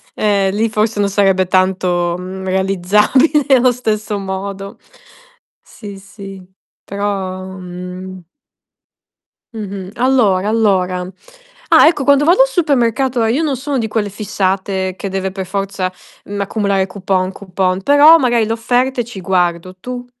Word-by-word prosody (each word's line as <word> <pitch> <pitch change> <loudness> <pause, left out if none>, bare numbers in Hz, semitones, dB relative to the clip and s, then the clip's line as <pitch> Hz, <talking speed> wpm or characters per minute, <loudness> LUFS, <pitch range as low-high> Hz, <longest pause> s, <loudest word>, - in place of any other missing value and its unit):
Eh 200 -2 +1
lì 220 +3 0
forse 215 0 0
non 200 - +2
sarebbe 195 -2 +2
tanto, 180 -2 +1
mhmm, 185 +1 -7
realizzabile 195 - +2
allo 250 0 +3
stesso 215 -3 -2
modo. 195 0 -6 0.8
Sì, 200 -3 -11
sì, 195 0 -11 0.4
però, 195 -2 -3
mhmm 180 -1 -9 1.3
Mh-mh, 200 -3 -7
allora, 220 -7 +2
allora. 185 -5 0 0.6
Ah, - - +6
ecco, 320 -4 -1
quando 285 +1 +4
vado 355 +10 +5
al - - +4
supermercato, 265 - +1
ehm, 225 +2 +1
io 315 - 0
non 285 -4 -1
sono 275 +1 -3
di 225 -2 -2
quelle 210 -1 -1
fissate 190 -2 -2
che 195 - -5
deve 190 0 -3
per 190 -1 -5
forza, 195 -1 -3 0.3
mhmm, 205 0 -6
accumulare 200 -1 0
coupon, 185 -1 -2
coupon, 185 -1 -2
però 290 +6 +7
magari 240 -5 +2
le 225 - -2
offerte 245 +2 0
ci 220 -4 -9
guardo, 180 -1 -1
tu? 245 +5 -7
200 Hz, 135 wpm, -16 LUFS, 185-230 Hz, 1.3 s, però